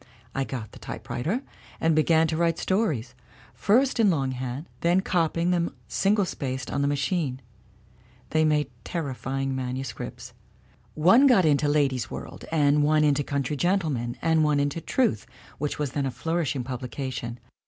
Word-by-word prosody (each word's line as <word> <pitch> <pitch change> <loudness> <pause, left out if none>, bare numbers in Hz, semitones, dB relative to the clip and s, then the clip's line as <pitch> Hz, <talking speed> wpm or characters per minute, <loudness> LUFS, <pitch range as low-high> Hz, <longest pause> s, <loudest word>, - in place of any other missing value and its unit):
I 135 0 -1
got 115 -6 -6
the - - -13
typewriter 185 - -3 0.4
and 165 -1 +2
began 160 +1 +4
to 160 0 -1
write 165 0 +1
stories, 155 - 0 0.4
first 250 +5 +2
in 215 -3 +5
longhand, 130 -2 -2
then 175 +2 +3
copying 170 -1 +1
them 170 -5 0
single 200 - +2
spaced 130 -6 -4
on - - 0
the 140 - +2
machine; 145 -1 -1 0.9
they 155 0 +3
made 150 -2 +2
terrifying 135 -4 -3
manuscripts. 125 -2 -5 0.6
One 205 - +6
got 215 -9 +5
into 150 -1 +3
the 145 - +2
Ladies' 135 -6 +1
World, - - -8
and 150 -2 +3
one 150 +1 +3
into 145 -1 +3
the - - -7
Country 140 0 -1
Gen 180 +7 +2
tleman, 125 -10 -2
and 160 -1 +3
one 150 -1 +2
into 145 +3 -1
Truth, 145 - 0 0.3
which 150 +1 -2
was 145 -3 -2
then 140 -2 -1
a - - -1
flourish 160 +1 -1
ing 130 - -2
publication. 125 -1 -5
145 Hz, 165 wpm, -26 LUFS, 130-165 Hz, 0.9 s, One